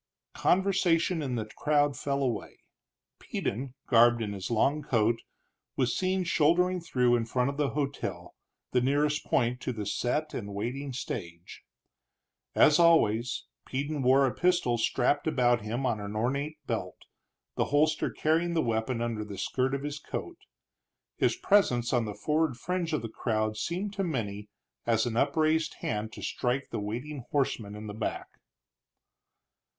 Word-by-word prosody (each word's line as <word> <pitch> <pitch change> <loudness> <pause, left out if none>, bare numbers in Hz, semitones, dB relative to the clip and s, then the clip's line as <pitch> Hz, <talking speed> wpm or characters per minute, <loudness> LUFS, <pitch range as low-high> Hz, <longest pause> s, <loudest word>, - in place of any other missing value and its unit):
Conversation 180 -3 +2
in 130 -4 -2
the 110 -2 -2
crowd 145 +5 +1
fell 140 -1 -1
away. 120 -5 -3 0.6
Peden, 130 +4 -4
garbed 120 0 +5
in 105 -1 -3
his 95 -1 -5
long 135 +6 +2
coat, 115 -4 +1 0.5
was 130 -3 +1
seen 185 0 0
shouldering 175 +2 +2
through 125 -7 +2
in 120 - +1
front 125 +3 +1
of 140 - -10
the 145 -2 +1
hotel, 140 -2 -3 0.4
the 125 - +3
nearest 145 +3 +1
point 125 +1 +1
to - - -2
the 110 -4 -5
set 125 +9 -1
and 100 -3 -5
waiting 130 +7 -3
stage. 85 -9 -6 0.9
As 150 +1 +6
always, 125 -9 +3 0.2
Peden 145 +2 -2
wore 135 +2 +5
a 130 - 0
pistol 175 -10 +2
strapped 135 +6 +1
about 120 -6 +3
him 115 +5 -3
on 120 -4 0 0.2
ornate 140 +7 -1
belt, - - -3 0.6
the - - +1
holster 150 +2 +2
carrying 165 +2 +1
the 160 - +2
weapon 115 +1 -1
under 115 -2 -2
the 105 -2 -8
skirt 130 +7 0
of 140 - -4
his 145 0 -4
coat. 350 - -6 0.8
His - - +2
presence 125 - +2
on 120 -2 +2
the 105 -1 -5
forward 155 -4 0
fringe 180 +2 -2
of 155 - -1
the - - -2
crowd 110 -1 -1
seemed 180 - -3
to 195 - -1
many 105 - -3 0.4
as 115 0 +3
an 120 -2 -2
upraised 155 +4 +2
hand 110 0 -2
to - - -9
strike 125 +3 -1
the 115 - -2
waiting 125 +8 -4
horseman 115 -7 -1
in 105 +1 -8
the 105 - -6
back. 110 - -4
130 Hz, 155 wpm, -29 LUFS, 115-155 Hz, 0.9 s, As